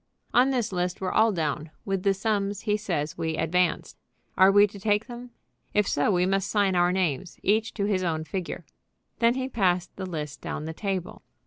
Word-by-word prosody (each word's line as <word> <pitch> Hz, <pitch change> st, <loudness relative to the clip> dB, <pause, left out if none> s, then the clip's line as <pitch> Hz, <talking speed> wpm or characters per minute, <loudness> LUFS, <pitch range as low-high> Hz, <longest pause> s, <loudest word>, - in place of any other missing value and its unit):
"On 255 Hz, +2 st, +5 dB
this 245 Hz, -5 st, 0 dB
list 180 Hz, -1 st, -2 dB
we're 185 Hz, -1 st, -2 dB
all 225 Hz, +1 st, +4 dB
down, 155 Hz, -3 st, -2 dB, 0.2 s
with 195 Hz, -2 st, -1 dB
the 195 Hz, 0 st, +2 dB
sums 200 Hz, -1 st, -1 dB
he 210 Hz, -2 st, +1 dB
says 170 Hz, -8 st, -3 dB
we 160 Hz, -1 st, -1 dB
advanced. 180 Hz, +3 st, 0 dB, 0.4 s
Are 190 Hz, +1 st, +6 dB
we 205 Hz, +1 st, +7 dB
to 200 Hz, 0 st, -9 dB
take 210 Hz, +1 st, +1 dB
them? 245 Hz, 0 st, -9 dB, 0.5 s
If 210 Hz, -1 st, +3 dB
so 145 Hz, -, +1 dB
we 180 Hz, -3 st, +3 dB
must 195 Hz, +1 st, 0 dB
sign 200 Hz, -3 st, +2 dB
our 175 Hz, 0 st, +3 dB
names, 180 Hz, -2 st, -1 dB
each 220 Hz, +3 st, +2 dB
to 200 Hz, -, -1 dB
his 200 Hz, -3 st, +1 dB
own 160 Hz, -3 st, -1 dB
figure." 185 Hz, +2 st, -5 dB, 0.5 s
Then 235 Hz, +1 st, +4 dB
he 260 Hz, 0 st, -2 dB
passed 185 Hz, -7 st, 0 dB
the 190 Hz, -1 st, -4 dB
list 150 Hz, -5 st, -5 dB
down 150 Hz, -, -5 dB
the 160 Hz, -, -5 dB
table. 190 Hz, -1 st, -4 dB
195 Hz, 200 wpm, -26 LUFS, 175-210 Hz, 0.5 s, we